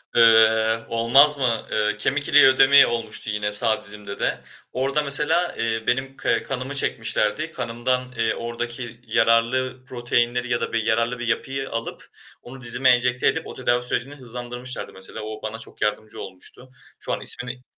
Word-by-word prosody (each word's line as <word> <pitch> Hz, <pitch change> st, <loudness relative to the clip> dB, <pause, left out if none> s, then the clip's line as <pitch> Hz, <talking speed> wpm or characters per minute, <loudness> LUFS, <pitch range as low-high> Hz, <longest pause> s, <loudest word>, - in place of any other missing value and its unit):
Eee, 110 Hz, -1 st, +5 dB
olmaz 135 Hz, +6 st, +5 dB
mı? 120 Hz, -5 st, -1 dB
Eee, 105 Hz, 0 st, 0 dB
kemik 140 Hz, +7 st, -1 dB
iliği 145 Hz, -1 st, +7 dB
ödemi 135 Hz, +1 st, +7 dB
olmuştu, 115 Hz, -2 st, -4 dB
yine 105 Hz, 0 st, -2 dB
sağ 110 Hz, +1 st, +1 dB
dizimde 100 Hz, 0 st, -7 dB
de. -, -, -1 dB, 0.3 s
Orada 135 Hz, +3 st, 0 dB
mesela, 150 Hz, +5 st, +1 dB
eee, 115 Hz, -1 st, -1 dB
benim 135 Hz, +2 st, -1 dB
ke -, -, 0 dB
kanımı 135 Hz, +1 st, -5 dB
çekmişlerdi. 135 Hz, +4 st, -1 dB
Kanımdan, 125 Hz, 0 st, -2 dB
eee, 115 Hz, -1 st, +1 dB
oradaki 120 Hz, 0 st, -6 dB
yararlı 120 Hz, +3 st, +1 dB
proteinleri 120 Hz, 0 st, -1 dB
ya 120 Hz, -, 0 dB
da -, -, -4 dB
bir 115 Hz, -1 st, 0 dB
yararlı 115 Hz, +2 st, 0 dB
bir 120 Hz, -, -4 dB
yapıyı 135 Hz, +3 st, -2 dB
alıp 115 Hz, 0 st, -5 dB, 0.4 s
onu 130 Hz, +2 st, -12 dB
dizime 125 Hz, +2 st, +2 dB
enjekte 125 Hz, 0 st, +2 dB
edip -, -, 0 dB
o -, -, -8 dB
tedavi 120 Hz, 0 st, 0 dB
sürecini 125 Hz, +3 st, -3 dB
hızlandırmışlardı 125 Hz, -1 st, -7 dB
mesela. 95 Hz, 0 st, -9 dB
O 110 Hz, 0 st, -7 dB
bana 110 Hz, +1 st, -6 dB
çok -, -, -11 dB
yardımcı 105 Hz, 0 st, -3 dB
olmuştu. 95 Hz, +7 st, -12 dB, 0.3 s
Şu -, -, -4 dB
an -, -, -3 dB
ismini 125 Hz, +1 st, +1 dB
120 Hz, 160 wpm, -23 LUFS, 115-130 Hz, 0.4 s, iliği